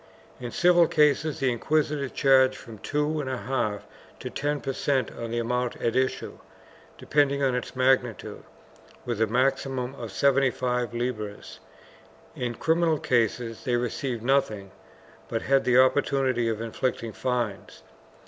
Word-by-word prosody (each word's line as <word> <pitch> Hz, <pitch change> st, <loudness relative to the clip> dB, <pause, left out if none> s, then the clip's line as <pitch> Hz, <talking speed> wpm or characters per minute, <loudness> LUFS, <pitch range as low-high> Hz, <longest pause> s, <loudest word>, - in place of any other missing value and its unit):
In 120 Hz, -, -5 dB
civil 175 Hz, +3 st, +4 dB
cases 150 Hz, 0 st, +2 dB
the 130 Hz, -2 st, +2 dB
inquisitors 145 Hz, +2 st, 0 dB
charged 130 Hz, -1 st, +4 dB
from 115 Hz, -4 st, -11 dB
two 150 Hz, +4 st, -1 dB
and 135 Hz, -, -4 dB
a 130 Hz, -, -2 dB
half 115 Hz, -6 st, -2 dB, 0.3 s
to -, -, -6 dB
ten 145 Hz, +1 st, -1 dB
per 135 Hz, -1 st, -4 dB
cent, 135 Hz, -1 st, 0 dB
on 115 Hz, -, -6 dB
the 120 Hz, -, -3 dB
amount 125 Hz, +1 st, -1 dB
at 115 Hz, -, -2 dB
issue, 130 Hz, 0 st, -1 dB, 0.6 s
depending 140 Hz, -1 st, +1 dB
on 130 Hz, -2 st, +2 dB
its 125 Hz, +1 st, -4 dB
magnitude, 130 Hz, -3 st, +1 dB, 0.6 s
with 120 Hz, -3 st, -3 dB
a 110 Hz, -, +3 dB
maximum 130 Hz, +1 st, 0 dB
of 115 Hz, -6 st, -7 dB
seventy 135 Hz, +7 st, +3 dB
five 125 Hz, -1 st, -2 dB
libras; 110 Hz, -4 st, -4 dB, 0.8 s
in 120 Hz, -1 st, -3 dB
criminal 160 Hz, +1 st, +2 dB
cases 115 Hz, -2 st, 0 dB
they 125 Hz, -3 st, 0 dB
received 120 Hz, 0 st, -2 dB
nothing 110 Hz, -7 st, 0 dB, 0.6 s
but 115 Hz, 0 st, -2 dB
had 135 Hz, 0 st, +2 dB
the 125 Hz, 0 st, +4 dB
opportunity 130 Hz, -2 st, +2 dB
of 110 Hz, -1 st, -3 dB
inflicting 115 Hz, 0 st, -3 dB
fines. 120 Hz, -6 st, -3 dB
130 Hz, 145 wpm, -26 LUFS, 120-140 Hz, 0.8 s, civil